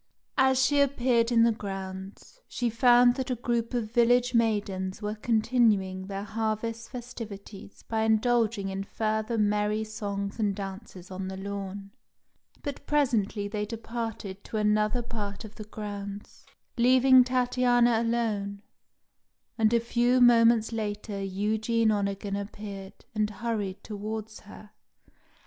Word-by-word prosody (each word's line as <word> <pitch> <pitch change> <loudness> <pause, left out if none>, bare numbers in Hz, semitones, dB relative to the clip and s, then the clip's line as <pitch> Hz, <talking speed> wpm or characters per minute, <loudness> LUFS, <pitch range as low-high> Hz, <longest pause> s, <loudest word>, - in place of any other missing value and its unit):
As 265 0 +4
she 290 +1 +2
appeared 245 -4 +2
in 230 -1 +5
the 230 - +5
grounds, 195 - -7
she 240 -2 -2
found 245 +1 +6
that 260 -1 -3
a 250 - 0
group 235 -1 -1
of 220 -3 -2
village 245 +1 +3
maidens 205 -5 0
were 210 0 -3
continuing 215 -4 +1
their 195 0 -4
harvest 220 +1 -3
festivities 215 -5 -9
by 220 -1 -2
indulging 220 -2 +2
in 195 0 -3
further 220 +2 -2
merry 210 0 +1
songs 205 -2 -4
and 205 -3 +1
dances 195 -2 -8
on 185 0 -5
the 190 0 -5
lawn; 200 0 -6 0.7
but 285 -1 -5
presently 230 -8 +1
they 210 0 -3
departed 225 -3 -5
to 220 - -5
another 215 +3 +2
part 210 -2 -5
of 215 - -11
the 215 - -9
grounds, 205 -1 -8 0.3
leaving 255 +1 +6
Tatiana 245 -2 +2
alone, 215 -4 -1 0.9
and 220 -2 +3
a 235 - +4
few 240 +2 +2
moments 230 -2 +5
later 210 -2 -4
Eugene 215 +3 +1
Onegin 200 -1 -1
appeared 200 -1 -7
and 215 -1 0
hurried 210 -3 -3
towards 215 +1 -6
her. 210 0 -14
215 Hz, 130 wpm, -28 LUFS, 200-235 Hz, 0.9 s, found